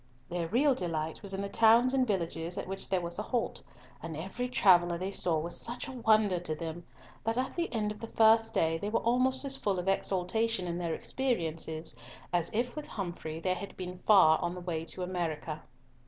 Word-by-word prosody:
Their 175 -1 -2
real 265 - +3
delight 160 -6 -2
was 200 - 0
in 195 - -3
the - - -2
towns 230 +5 +5
and 260 -2 +2
villages 170 -3 -2
at - - -4
which 195 +1 -4
there 185 -2 +1
was 170 +2 -3
a - - +1
halt, 235 +2 -2 0.4
and 160 -1 -6
every 195 +9 -4
traveller 175 -7 +4
they 185 +3 -3
saw 175 -4 +2
was 170 +2 -3
such 240 +2 -4
a - - -6
wonder 215 -6 +3
to 165 -3 -3
them, 165 +2 -6 0.4
that 225 +1 -1
at 260 +1 -1
the 340 -1 -2
end 215 -3 -1
of 210 - -9
the 230 - -6
first 225 0 +4
day 165 0 +1
they 205 - -3
were 230 - +1
almost 255 +3 +2
as 270 -1 +1
full 200 -6 -1
of 180 +1 -4
exultation 195 +2 0
in 175 0 -3
their 170 -2 -2
experiences, 165 - -2 0.4
as 175 -2 +2
if, 240 +4 -1
with 300 - -6
Humfrey, 170 -5 -5
they 185 +2 0
had 185 +2 -7
been 180 -1 -6
far 175 -7 +7
on 175 +1 -2
the 180 - -7
way 165 -2 -3
to 180 - -3
America. 165 -4 -3
185 Hz, 215 wpm, -31 LUFS, 170-225 Hz, 0.4 s, far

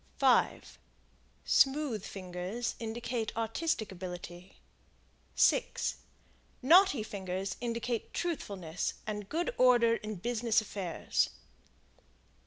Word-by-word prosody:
5 - - +2 0.7
Smooth 270 -6 +3
fingers 185 +5 -4
indicate 230 0 -3
artistic 230 0 -1
ability. 180 0 -8 0.8
6 - - +2 0.7
Knotty 335 - +6
fingers 190 -2 -4
indicate 235 -1 -2
truthfulness 195 - -3
and 210 -2 -5
good 345 +10 -1
order 240 -2 +5
in 215 0 -6
business 230 +3 +1
affairs. 195 -6 -1
220 Hz, 80 wpm, -31 LUFS, 190-245 Hz, 0.8 s, Knotty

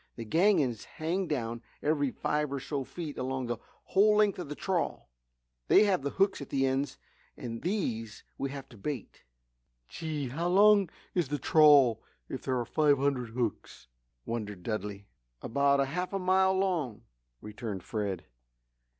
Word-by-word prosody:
These 115 -2 -7
gangins 160 - +3
hang 175 +4 -1
down 120 -6 -2 0.2
every 145 -2 +2
five 150 +3 -1
or 140 - -2
so 135 +1 -3
feet 155 +1 -7
along 130 0 -2
the 120 -1 -3 0.2
whole 210 +2 +4
length 210 -3 +3
of 170 -5 -5
the 150 - -4
trawl. 180 - -2 0.6
They - - +7
have 195 -6 +2
the 140 - -2
hooks 195 +1 +1
at 140 - -7
the 135 -1 +1
ends 135 +2 -1 0.4
and 115 -1 -6
these 115 - -2
we 140 - -3
have 135 -1 -7
to 120 - -14
bait." 135 0 -5 0.7
"Gee! 150 -5 -4
How 165 +7 -2
long 200 0 +5 0.2
is 175 -5 +1
the 145 +2 -2
trawl 145 -6 +6 0.3
if - - -5
there 130 -1 -1
are 120 - -2
five 145 +3 +3
hundred 130 -3 0
hooks?" 115 - -3 0.4
wondered 105 -5 -4
Dudley. 105 -2 -4 0.4
"About 140 +2 +2
half 180 +7 -3
a - - +1
mile 190 0 +3
long," 175 - -1 0.4
returned 105 - -6
Fred. 100 -5 -3
140 Hz, 160 wpm, -30 LUFS, 120-175 Hz, 0.7 s, They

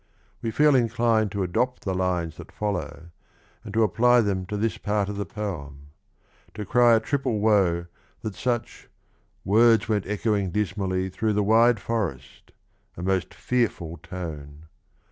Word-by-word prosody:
We 115 - -2
feel 150 +6 +4
inclined 115 -3 +2
to 100 -1 -1
adopt 125 +8 -1
the 95 - 0
lines 90 -3 -1
that - - -11
follow 90 -5 -4 0.5
and 110 - -8
to 115 - +4
apply 120 +3 +4
them 95 -4 -1
to 105 - -3
this 110 +2 -1
part 105 -1 -1
of 105 - -4
the 100 - -3
poem: 75 -9 -6 0.7
to 105 -1 -5
cry 120 +3 +5
a - - +4
triple 130 0 -1
woe 100 -5 +2 0.4
that 110 - -3
such 120 +1 -3 0.6
words 115 +3 +4
went 105 -3 0
echoing 105 -1 0
dismally 95 -1 -1
Through 110 +3 -1
the 105 0 +1
wide 115 +2 +4
forest 95 - -4 0.2
— - - -40
a 85 - -6
most 95 -1 0
fearful 100 -9 -2
tone. 75 -3 -8
105 Hz, 155 wpm, -25 LUFS, 90-115 Hz, 0.7 s, cry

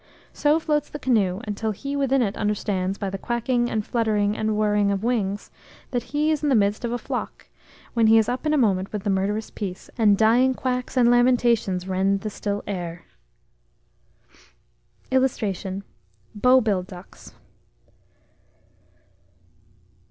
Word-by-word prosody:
So 300 +2 +2
floats 300 -2 -1
the - - -6
canoe 215 -8 +1
till 220 +2 -3
he 275 +7 -4
within 270 -2 +2
it 200 -3 -2
understands, 200 -2 -1
by 195 -1 -3
the 195 - -5
quacking, 240 +1 0
and 215 -1 -2
fluttering, 210 -3 0
and 215 -1 -1
whirring 210 -1 +2
of 200 0 -1
wings, 210 -4 -1 0.4
that 245 -2 -2
he 300 +2 0
is 305 - 0
in 300 - 0
the 270 - +4
midst 205 +1 +1
of 235 - -2
a 245 - -1
flock, - - -6 0.4
when 230 -2 +3
he 225 +1 +6
is 220 -1 +3
up 255 +5 -2
in - - +2
a 305 - +3
moment 195 -7 +1
with 210 -2 -4
the 205 - 0
murderous 205 +3 -1
piece, 190 -4 -6
and 205 -3 +5
dying 245 +4 +4
quacks 250 0 -3
and 240 -1 +5
lamentations 240 -7 +2
rend 195 +1 +1
the 215 - -4
still 205 0 -3
air. 175 -4 -5 2.1
[Illustration: 200 -7 -1 0.5
BOW 250 +5 +4
BILL 205 -5 +1
DUCKS. 180 0 -13
215 Hz, 150 wpm, -24 LUFS, 200-250 Hz, 2.1 s, he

